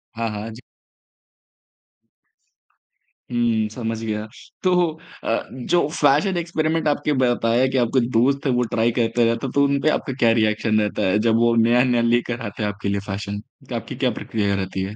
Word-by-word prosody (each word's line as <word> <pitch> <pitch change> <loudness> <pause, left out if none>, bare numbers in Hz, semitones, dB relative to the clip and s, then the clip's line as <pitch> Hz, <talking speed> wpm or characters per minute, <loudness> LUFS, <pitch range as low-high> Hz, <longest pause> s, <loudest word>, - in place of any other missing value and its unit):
हाँ, 115 0 -2
हाँ, 105 +2 -5
जी। 115 +3 -11 2.7
हुँ, 115 -2 +1
समझ 115 0 -4
गया। 105 -1 -3 0.4
तो 185 - +3 0.5
अ, 115 - 0
जो 140 +5 0
फैशन 155 +6 +2
एक्सपेरिमेंट 160 -1 -1
आपके 145 0 +1
बताया 120 +1 +2
कि 130 0 -1
आपके 125 +2 +2
दोस्त 135 +6 +2
हैं, 130 - +2
वो 125 0 +2
ट्राई 115 +1 +2
करता 115 +1 +2
रहता 115 +3 0
है, - - -6
तो 140 - +3
उन 140 0 +2
पर 155 - +3
आपका 135 - -2
क्या 115 -2 +4
रिएक्शन 110 0 +1
रहता 105 - -2
है 105 +3 +2
जब 110 - +3
वो 120 0 +3
नया-नया 120 +1 +3
लेकर 120 0 0
आते 105 0 -5
हैं 105 - 0
आपके 105 0 -4
लिए 100 0 0
फैशन? 100 +1 -4 0.3
तो - - -4
आपकी - - -5
क्या - - 0
प्रक्रिया 100 -3 -1
रहती 95 0 -3
है? 100 +2 -6
115 Hz, 180 wpm, -22 LUFS, 110-130 Hz, 2.7 s, क्या